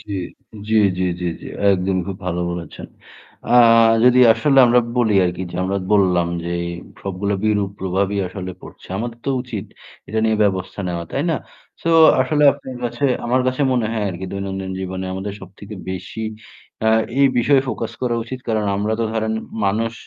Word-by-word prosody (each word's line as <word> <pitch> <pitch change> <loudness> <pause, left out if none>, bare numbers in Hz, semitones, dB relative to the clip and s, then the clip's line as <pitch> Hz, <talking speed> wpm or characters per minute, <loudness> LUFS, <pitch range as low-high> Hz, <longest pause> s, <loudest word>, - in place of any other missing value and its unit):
জ্বী, 100 -2 -6 0.5
জ্বি, 110 0 +3 0.2
জ্বি, 95 - +1
জি, 90 - -2
জি। - - -10 0.3
একদমই 95 -1 0
খুব 95 -1 -5
ভালো 90 0 -1
বলেছেন। 85 -2 -7 0.7
আ - - +5 0.5
যদি 125 0 +6
আসলে 135 +3 +2
আমরা 120 +1 +5 0.2
বলি 110 -4 +2
আরকি 90 +1 -2
যে 85 - -6
আমরা 100 +1 -1
বললাম 90 -4 +3 0.2
যে 85 - -3 0.5
সবগুলা 100 +1 -2
বিরূপ 105 -2 +1
প্রভাবই 95 +2 -1
আসলে 95 -1 -6
পড়ছে। - - -13
আমাদের 120 +1 -5
তো - - +1
উচিত 110 -6 -6 0.4
এটা 110 +2 -2
নিয়ে 110 -1 +2
ব্যবস্থা 95 0 -2
নেওয়া। 85 -1 -3
তাই 140 - 0
না? 160 - +1 0.5
সো 165 - 0 0.3
আসলে 150 +3 0
আপনার 130 -3 -9
কাছে 120 +4 -3 0.2
আমার 130 +2 +2
কাছে 130 +3 -1
মনে 120 -3 +1
হয় 110 -2 -1
আরকি 95 +2 -6
দৈনন্দিন 95 -1 -4
জীবনে 95 0 -4
আমাদের 100 +2 -5
সবথেকে 100 +3 -11 0.2
বেশি 95 +4 -6 0.6
আ - - +5 0.3
এই 140 - +6
বিষয়ে 135 +2 +4
ফোকাস - - -3
করা 120 -2 0
উচিত। 130 +2 -7
কারণ 110 -1 0
আমরা 105 +2 -1
তো 115 - +1
ধরেন 110 0 -1 0.3
মানুষ 110 +3 0
100 Hz, 175 wpm, -20 LUFS, 95-120 Hz, 0.7 s, যদি